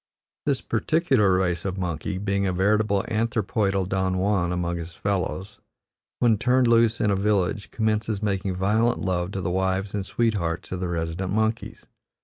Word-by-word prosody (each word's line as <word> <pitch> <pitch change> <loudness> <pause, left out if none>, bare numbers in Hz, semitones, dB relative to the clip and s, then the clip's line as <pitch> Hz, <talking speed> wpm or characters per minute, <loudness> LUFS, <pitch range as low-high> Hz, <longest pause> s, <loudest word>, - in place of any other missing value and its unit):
This 140 -3 +1
particular 115 - +2
race 90 -2 0
of 95 -1 -3
monkey, 90 +1 -3
being 100 0 0
a - - +1
veritable 100 +2 +2
anthropoidal 110 -4 0
Don 95 -1 0
Juan 95 -2 +1
among 85 -1 -1
his 85 0 -7
fellows, 100 +1 -3 0.6
when 115 -4 +3
turned 125 +1 +3
loose 115 -1 +4
in 105 - +2
a - - +2
village 100 0 0
commences 110 -1 -1
making 95 -2 -1
violent 110 +5 +1
love 90 -1 -1
to 95 - -3
the 90 - -2
wives 95 +1 -1
and 100 -2 -1
sweethearts 95 -6 -1
of 90 - -3
the 90 - -2
resident 85 +2 -3
monkeys. 110 +1 -1
100 Hz, 160 wpm, -25 LUFS, 90-110 Hz, 0.6 s, loose